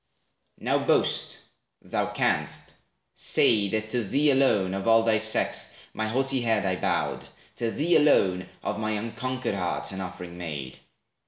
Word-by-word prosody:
Now - - 0
boast; - - +1 0.5
thou - - -2
can'st! - - -1 0.4
Say, 105 -3 +3
that 110 +1 -2
to 120 0 0
thee 145 +8 +2
alone 110 -9 +2
Of 95 +2 -4
all 115 0 +5
thy 110 -1 +2
sex, 110 0 +2 0.2
my 110 +1 -2
haughty 135 +3 +1
head 110 -3 +1
I 95 -1 +1
bowed, - - -2 0.3
To 115 - -1
thee 160 +7 +2
alone, 95 -12 +2
of - - -3
my 110 0 -1
unconquered 125 +3 -3
heart 90 -1 -2
An 95 0 -5
offering 90 -1 -8
made. 75 -6 -6
110 Hz, 150 wpm, -26 LUFS, 95-125 Hz, 0.5 s, all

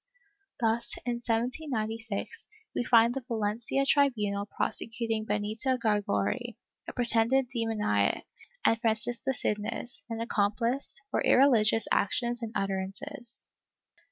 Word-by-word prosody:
Thus, 230 0 0
in 240 -1 -1
1796, 230 - -2 0.3
we - - +1
find 235 -1 +5
the 270 - -3
Valencia 225 +3 0
tribunal 210 -9 +2
prosecuting 225 0 -2
Benita 215 +5 0
Gargori, 210 -3 0 0.3
a - - -5
pretended 245 +1 +3
demoniac, 220 - 0 0.4
and 225 0 +4
Francisca 230 +3 0
Signes, 210 0 -3
an 230 - -3
accomphce, 230 +5 0
for - - +1
irrehgious 225 -5 +5
actions 240 +4 +1
and 225 -1 -4
utterances. 200 +7 -4
230 Hz, 100 wpm, -29 LUFS, 210-245 Hz, 0.4 s, find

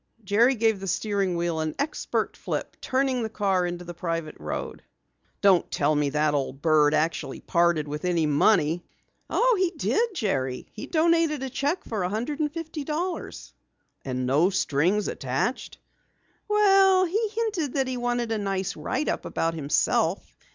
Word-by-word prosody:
Jerry 230 +7 +3
gave 220 -3 +2
the 195 - -6
steering 195 -1 0
wheel 170 -1 -1
an 155 -1 -2
expert 295 +2 -2
flip, - - -4
turning 260 -1 0
the 220 - -2
car 195 -4 +1
into 175 0 -5
the 175 - -7
private 165 -2 -4
road. - - -5 0.6
"Don't 195 -3 +4
tell 150 +1 +1
me 145 -1 +1
that 150 +1 +1
old 135 -1 -2
bird 155 -1 +4
actually 160 +2 -1
parted 170 -3 +1
with 150 +1 -5
any 175 -3 +1
money!" 160 +2 +3 0.5
"Oh, - - +3
he 370 -2 +3
did, 445 +6 0
Jerry. 130 - -1
He 210 - -7
donated 330 -3 +2
a 265 - -4
cheque 290 +7 -1
for 220 -4 -3
a 180 - 0
hundred 245 - -3
and 300 -1 0
fifty 320 -2 -5
dollars." 335 +5 -4 0.5
"And 130 -1 -3
no 145 +8 +3
strings 185 +3 +1
attached?" 135 - -2 0.7
"Well, 390 -3 +5
he 425 +5 0
hinted 405 - -1
that 270 -2 +1
he 255 - -2
wanted 240 -1 -1
a 220 - 0
nice 195 -1 -2
write 270 +4 -2
up - - -1
about 165 0 -1
himself. 150 -3 0
200 Hz, 165 wpm, -26 LUFS, -, 0.7 s, Well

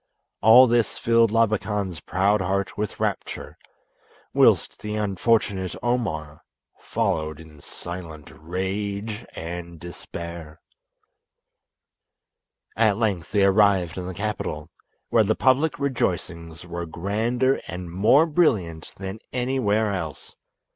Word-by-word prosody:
All 120 +4 +9
this 120 -3 +1
filled 115 -1 +3
Labakan's 105 -5 0
proud 100 +3 +1
heart 95 +1 -1
with 105 -1 -4
rapture, - - -3 0.8
whilst - - +3
the 105 0 -4
unfortunate 100 -2 0
Omar 80 -12 -2 0.4
followed 80 -1 -2
in 80 -3 -14
silent 85 -3 -8
rage 100 +5 -4
and 85 0 -6
despair. 85 -2 -8 2.2
At 110 -3 +3
length 100 -7 -1
they 100 -2 +4
arrived 95 -4 +3
in 90 -1 -5
the 95 - -6
capital, 85 -7 -4 0.4
where 115 - +4
the 110 +1 +1
public 140 +4 +2
rejoicings 90 - -3
were 85 0 -5
grander 115 +10 0
and 90 0 -6
more 110 - +5
brilliant 110 - 0
than 95 +2 -6
anywhere 115 -5 +1
else. 80 -6 -6
100 Hz, 105 wpm, -24 LUFS, 85-110 Hz, 2.2 s, All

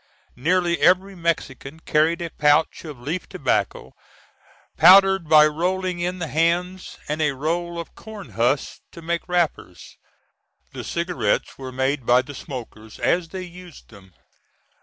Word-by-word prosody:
Nearly 175 +5 +1
every 185 +2 +3
Mexican 160 -4 -3
carried 165 +2 +1
a 170 - -6
pouch 150 +3 +2
of 150 -5 -9
leaf 155 +8 -5
tobacco, - - -2 0.8
powdered 190 -1 +6
by 155 -1 +8
rolling 180 +4 -1
in 180 +1 -2
the 175 - -3
hands, 170 +5 -1
and 150 +1 -2
a 150 -2 +1
roll 170 +4 -3
of 170 - -8
corn 215 -3 -11
husks 120 +5 -1
to 170 - -11
make 170 +2 -3
wrappers. 170 - -2 0.8
The - - -7
cigarettes 170 - -2
were 130 -1 -7
made 130 +1 -1
by 125 +1 +4
the 145 - -10
smokers 115 -5 -9
as 175 -2 0
they 190 +1 -6
used 180 -2 -13
them. 95 -4 -17
165 Hz, 140 wpm, -22 LUFS, 140-180 Hz, 0.8 s, by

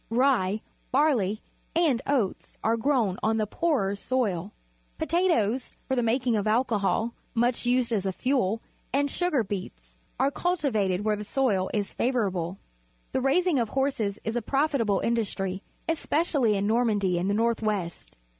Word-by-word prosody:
Rye, 230 -5 +2 0.3
barley, 245 -8 +2 0.3
and 310 -8 +3
oaj^ 250 -9 -1
are 225 +1 +3
grown 230 -6 +1
on 220 +1 +1
the 215 - +1
poorer 250 - 0
soiL 205 -5 -1 0.5
PotnfofiS 270 - +1
for 265 - 0
the 245 - +2
making 240 +1 +1
of 210 0 0
alcohol, 225 0 +1 0.2
much 240 +1 +1
used 245 -1 +2
as 200 -4 0
a - - +1
fuel, 225 -1 0 0.3
and 285 +1 +1
sugar 350 -9 +1
beet 195 -2 -4
s - - -28 0.2
are 270 +2 +3
cultivated 245 - 0
where 215 -1 +2
the 210 - -5
soil 210 -6 +1
is 205 -2 -2
favourable. 195 -8 -1 0.5
The - - 0
raising 310 +3 +3
of 230 -2 0
horses 245 -7 0
is 225 +1 -3
a 240 - 0
profitable 270 -6 +1
industry, 195 -5 -1 0.3
especially 300 -8 +1
in 195 - 0
Normandy 210 -5 +2
in 180 - -1
the 200 - +1
north 230 +1 +1
west. 200 -6 -3
230 Hz, 155 wpm, -27 LUFS, 200-265 Hz, 0.5 s, and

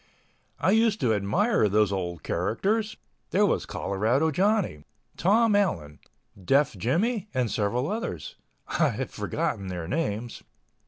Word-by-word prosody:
I 190 - +2
used 220 0 +3
to 115 -3 +3
admire 110 - +2
those 105 0 +3
old 85 -5 -3
characters. 205 - -1 0.3
There - - +3
was - - 0
Colorado 120 +11 0
Johnny, 190 - +1 0.3
Tom 210 +4 +3
Allen, 90 - 0 0.4
Deaf 135 +4 +3
Jimmie 185 - 0
and 125 -4 0
several 115 +6 0
others... 155 - -4 0.3
I - - +2
have - - -4
forgotten 100 - -2
their 90 -3 -5
names. 120 - -3
125 Hz, 125 wpm, -26 LUFS, -, 0.4 s, used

